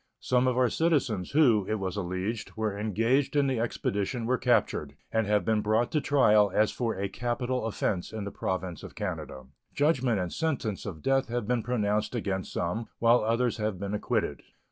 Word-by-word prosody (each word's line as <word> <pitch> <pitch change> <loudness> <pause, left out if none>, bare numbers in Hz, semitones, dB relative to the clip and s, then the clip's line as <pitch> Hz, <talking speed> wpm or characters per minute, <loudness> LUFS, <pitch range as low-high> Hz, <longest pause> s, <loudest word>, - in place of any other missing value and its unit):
Some 125 0 +2
of 125 -1 +1
our 130 -1 +4
citizens 140 - +1
who, 120 -10 +4
it 110 - +1
was 95 -3 -3
alleged, 100 +4 -3
were 110 -2 -1
engaged 115 +8 +1
in 145 -1 +4
the 130 -3 0
expedition 115 0 -2
were 125 +1 +1
captured, - - +1 0.2
and 110 -2 +1
have 105 -3 +2
been 110 -1 +2
brought 110 +3 +1
to 150 - +1
trial 105 -8 +4
as 110 0 +3
for 120 -2 -2
a 100 +1 -1
capital 120 +3 -2
offense 100 -4 -2
in 110 -2 -5
the 100 - -5
Province 95 -2 -3
of - - -10
Canada. 65 - -5 0.3
Judgment 130 -7 +2
and 90 -1 -3
sentence 135 -12 -2
of 80 -6 -7
death 135 0 +2
have 120 -2 -3
been 125 -1 +1
pronounced 105 -2 0
against 95 -5 -2
some, 105 +7 -2
while 115 0 +4
others 115 +2 +1
have 105 -4 -2
been 100 +1 -4
acquitted. 105 - -1
110 Hz, 190 wpm, -28 LUFS, 100-125 Hz, 0.3 s, our